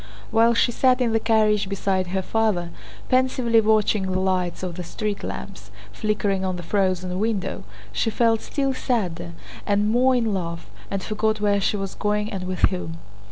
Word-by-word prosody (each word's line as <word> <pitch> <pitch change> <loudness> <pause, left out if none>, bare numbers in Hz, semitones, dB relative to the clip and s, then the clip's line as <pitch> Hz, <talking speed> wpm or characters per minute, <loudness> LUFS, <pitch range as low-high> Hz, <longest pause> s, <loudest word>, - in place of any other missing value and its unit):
While 230 +1 +4
she 240 - +3
sat 255 +1 +3
in 245 -3 +1
the 225 - +2
carriage 215 -3 +2
beside 190 -2 0
her 190 +1 -2
father, 200 -6 0 0.4
pensively 255 -3 +3
watching 215 -2 +2
the 185 - 0
lights 185 -2 -1
of 180 -2 -3
the 180 - -5
street 210 +4 -4
lamps 190 - -7 0.2
flickering 205 - 0
on 185 -1 -1
the 175 - -6
frozen 185 -1 0
window, 215 -3 -1 0.3
she 225 - 0
felt 225 0 +2
still 275 -2 -1
sadder 180 -10 -2 0.3
and 205 +1 +1
more 255 +2 +4
in 230 -4 +1
love, 170 -3 -3 0.2
and 195 -1 -3
forgot 215 0 0
where 205 -1 +2
she 205 - +1
was 195 -1 -4
going 210 0 -1
and 190 -2 -4
with 185 0 -4
whom. 165 -3 -4
205 Hz, 175 wpm, -23 LUFS, 185-225 Hz, 0.4 s, While